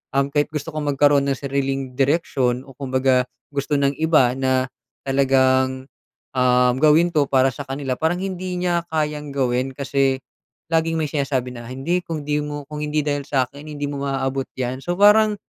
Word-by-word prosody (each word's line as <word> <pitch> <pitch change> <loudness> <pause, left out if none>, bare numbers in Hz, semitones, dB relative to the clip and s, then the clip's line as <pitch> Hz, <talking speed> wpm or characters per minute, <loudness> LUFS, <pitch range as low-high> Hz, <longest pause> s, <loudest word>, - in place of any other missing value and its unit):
uhm, 140 0 +2
kahit 145 0 +1
gusto 150 +1 -4
kong 155 -1 -4
magkaro'n 145 0 +4
ng 140 -1 +1
sariling 135 -2 -2
direksyon 135 -4 +1
o 135 - -13
kumbaga 130 -2 +1 0.3
gusto 145 +1 -1
ng 140 0 +2
iba 155 -6 +4
na 130 -1 +2 0.4
talagang, 130 -1 +2 0.5
uhm, 125 -1 +3
gawin 155 +3 +5
'to 145 -3 +2
para 130 0 +3
sa 145 +3 -8
kanila 135 -1 -3
parang 160 +2 +1
hindi 185 -1 -4
niya 175 -1 0
kayang 150 -2 -2
gawin 130 0 0
kasi 135 -1 0 0.5
laging 165 0 +1
may 155 - 0
sinasabi 135 -4 -1
na, 120 -1 -9
"hindi 135 +8 -1
kung 160 -4 -5
di 150 0 +1
mo 145 0 -5
kung 150 - -5
hindi 150 0 0
dahil 145 -1 -1
sa'kin 140 +1 -2
hindi 145 -1 -6
mo 140 -1 -4
maaabot 135 0 -2
'yan", 130 0 -2
so 175 - -2
parang, 210 +1 +6
140 Hz, 175 wpm, -21 LUFS, 130-150 Hz, 0.5 s, parang